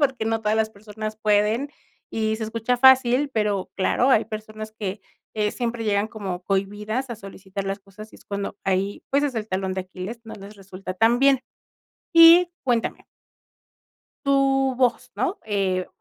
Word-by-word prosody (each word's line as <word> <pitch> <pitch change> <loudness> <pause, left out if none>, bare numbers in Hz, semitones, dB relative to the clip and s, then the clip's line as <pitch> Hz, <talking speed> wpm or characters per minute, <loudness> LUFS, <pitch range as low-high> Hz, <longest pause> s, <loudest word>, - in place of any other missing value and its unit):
porque 265 -6 +1
no 225 0 0
todas 215 0 +1
las 220 0 +1
personas 215 +1 -7
pueden 215 +5 +2 0.4
y 220 0 -1
se 220 - -4
escucha 230 +3 -1
fácil, 265 +1 +5
pero 210 -4 -1
claro, 240 +6 +2
hay 225 - +4
personas 215 0 -7
que, 205 -2 -5 0.4
eh, 210 0 +2
siempre 235 -1 -3
llegan 205 0 +1
como 190 -5 -5
cohibidas 210 +6 -2
a - - -3
solicitar 195 -1 -7
las 195 +1 -3
cosas, 205 +2 -13
y - - -13
es - - -20
cuando 200 0 -4
ahí, 195 +1 -1
pues, 280 +1 +2
es 280 -4 -1
el 215 -1 -3
talón 185 0 -2
de 190 - -2
Aquiles, 185 +5 -7
no 220 - -9
les 200 +1 -11
resulta 185 -1 -8
tan 230 +5 +3
bien, 270 -1 +4 0.7
y 335 +1 +8
cuéntame 240 -3 -1 1.2
tu 270 -1 +3
voz, 250 -2 +1
¿no? 390 +2 -1
Eh, 190 -3 0
215 Hz, 170 wpm, -24 LUFS, 200-245 Hz, 1.2 s, y